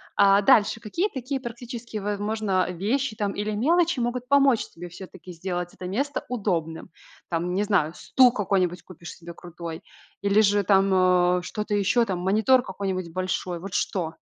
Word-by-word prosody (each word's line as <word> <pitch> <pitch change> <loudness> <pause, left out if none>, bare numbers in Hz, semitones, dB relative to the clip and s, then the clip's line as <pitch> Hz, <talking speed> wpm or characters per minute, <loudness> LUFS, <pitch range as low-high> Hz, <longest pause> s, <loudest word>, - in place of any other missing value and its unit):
А, 200 0 +5
дальше, 205 +1 +4
какие 340 - -2
такие 265 +1 -4
практические, 235 -2 -7
возможно, 205 -2 -1
вещи, 215 +7 -1
там, 205 -2 -1
или 210 +1 -3
мелочи 325 +7 +2
могут 245 +1 -2
помочь 275 -4 +3
тебе 175 +1 -10
всё-таки 185 0 -11
сделать 175 0 -4
это 185 - -9
место 275 +9 -2
удобным? 175 -11 -3 0.4
Там, 175 +1 -2
не 200 - +1
знаю, 185 -6 +1
стул 255 -2 +4
какой-нибудь 185 -5 -1
купишь 170 -2 -11
себе 170 0 -11
крутой 170 0 -8 0.4
или 200 +1 +3
же 205 -1 +3
там, 185 -2 +3
э, - - -7
что-то 210 +4 -4
ещё, 205 +4 +2
там, 185 -4 -3
монитор 220 +8 +3
какой-нибудь 190 -5 -4
большой. 185 -1 -3
Вот 190 +1 -8
что? 165 -4 -1
200 Hz, 160 wpm, -25 LUFS, 180-230 Hz, 0.4 s, А